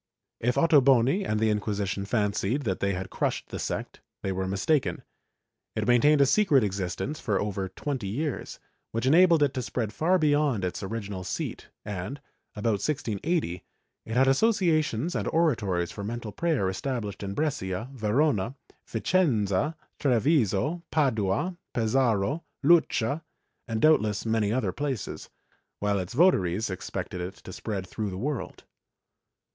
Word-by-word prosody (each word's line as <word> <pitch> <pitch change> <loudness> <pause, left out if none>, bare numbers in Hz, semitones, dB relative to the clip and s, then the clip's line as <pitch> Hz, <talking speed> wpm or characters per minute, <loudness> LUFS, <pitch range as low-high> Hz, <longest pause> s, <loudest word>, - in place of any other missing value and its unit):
^ - - -63 0.4
If 125 - +3
Ottoboni 140 - +4
and 110 - +1
the 110 0 +3
Inquisition 105 -2 -2
fancied 105 +4 0
that 95 -6 -1
they 100 0 +1
had 95 0 -5
crushed - - -2
the - - -5
sect, - - -4 0.2
they 95 - -1
were 95 0 -2
mistaken. 115 +10 0 0.7
It 110 0 -1
maintained 140 +5 +5
a - - +7
secret 145 - +4
existence 100 - -3
for 105 -4 0
over 100 -2 -2
twenty 130 +2 -4
years, 140 +8 -3 0.4
which 115 +2 -1
enabled 165 +2 +6
it 140 -2 +1
to 130 - -2
spread 115 -3 -3
far 175 +8 +2
beyond 145 - +2
its 90 - -3
original 100 -2 -4
seat 95 +1 -4 0.2
and, 105 +7 -5 0.4
about 105 -1 0
1680, 120 - -1 0.4
it 115 +2 -2
had 135 +1 +5
associations 160 - +2
and - - -2
oratories 110 - +1
for 100 - -7
mental 115 +1 -4
prayer 150 - 0
established 105 +1 -3
in 100 -1 -4
Brescia, 110 -8 -2
A'erona, 120 -1 +1 0.3
A'icenza, 115 - +1 0.2
Treviso, 135 - +2
Padua, 130 - +1 0.2
Pesaro, 120 +3 +1 0.2
Lucca 155 -4 +3 0.5
and 110 -1 -2
doubtless 110 -8 +3
many 110 -2 +1
other 130 +3 0
places, 135 -4 -4 0.5
while 100 -1 0
its 90 +4 -5
votaries 110 - +3
expected 90 0 -5
it 90 +2 -5
to 95 - -11
spread 100 -2 -4
through 105 +3 -4
the 95 - -6
world. 140 +4 -4
115 Hz, 140 wpm, -27 LUFS, 100-145 Hz, 0.7 s, a